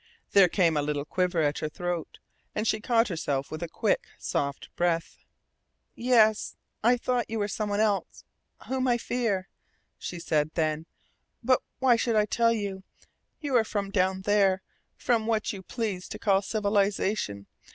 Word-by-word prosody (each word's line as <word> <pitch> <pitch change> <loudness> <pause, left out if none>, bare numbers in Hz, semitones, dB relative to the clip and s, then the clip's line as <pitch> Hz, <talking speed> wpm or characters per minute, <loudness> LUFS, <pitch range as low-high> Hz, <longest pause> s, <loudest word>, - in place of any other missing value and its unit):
There 195 -3 +6
came 170 -3 +2
a 150 - +2
little 145 0 -2
quiver 180 0 0
at 145 0 0
her 155 - -2
throat, 175 0 -4 0.4
and 215 +2 -1
she 215 - +2
caught 230 +1 +2
herself 145 -6 -2
with 155 - -5
a 170 - -2
quick, - - 0
soft 140 -1 -3
breath. 170 -1 0 0.7
"Yes, 225 -3 +3 0.3
I 245 +2 +5
thought 245 0 -1
you 225 - -2
were 205 -1 0
some 210 +1 -3
one 205 0 0
else 210 -2 0 0.4
whom 260 0 0
I 240 -1 +3
fear," 225 -6 -1 0.5
she 175 - -5
said 155 -2 +1
then. 155 0 0 0.6
"But 255 +2 +3 0.2
why 255 -3 +4
should 230 0 0
I 210 -1 +4
tell 230 +2 +2
you? 200 -4 -3 0.6
You 285 -4 -1
are 230 - +4
from 200 -2 -3
down 190 -1 +1
there, 195 -2 +3 0.3
from 230 -3 0
what 220 -2 0
you 195 - -7
please 200 -3 -4
to - - -6
call 195 -2 +2
civilization. 200 - 0
200 Hz, 165 wpm, -28 LUFS, 175-225 Hz, 0.7 s, There